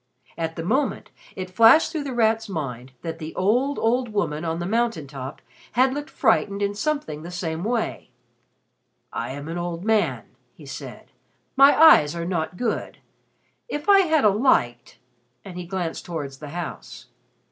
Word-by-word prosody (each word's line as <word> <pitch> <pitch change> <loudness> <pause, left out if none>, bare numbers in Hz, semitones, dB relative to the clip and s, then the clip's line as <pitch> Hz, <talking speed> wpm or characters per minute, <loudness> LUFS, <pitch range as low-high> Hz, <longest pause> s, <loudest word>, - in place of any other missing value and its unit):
At 165 0 -3
the 165 - -5
moment 265 +10 -1 0.2
it 185 -1 -6
flashed 230 - +6
through 310 -4 -3
The 275 - -4
Rat's 225 -1 +1
mind 130 -7 -5
that 165 -1 -5
the 155 0 -7
old, 245 +9 +1
old 245 +2 +1
woman 165 -7 -1
on 165 -1 -2
the 175 - -3
mountain 225 -6 0
top 135 0 -8 0.3
had 260 +2 +3
looked 290 +1 -5
frightened 210 -6 +1
in 200 0 0
something 210 - -3
the 170 - -8
same 170 -2 -4
way. 230 +1 -2 1.0
"I 115 - -3
am 140 +3 -7
an 170 +2 -4
old 175 +1 -4
man," 220 -2 +1 0.3
he - - -14
said. - - -9 0.4
"My 275 +2 +6
eyes 170 - +7
are 170 0 -3
not 170 -1 -2
good. 230 0 -3 0.7
If 295 +2 -5
I 400 -1 +7
had 315 - +3
a - - +7
light" 160 - +1 0.5
and 190 -3 -9
he 180 -1 -6
glanced 175 -2 -3
towards 145 -6 -6
the 150 - -8
house. 175 +1 -7
185 Hz, 170 wpm, -23 LUFS, 160-240 Hz, 1.0 s, eyes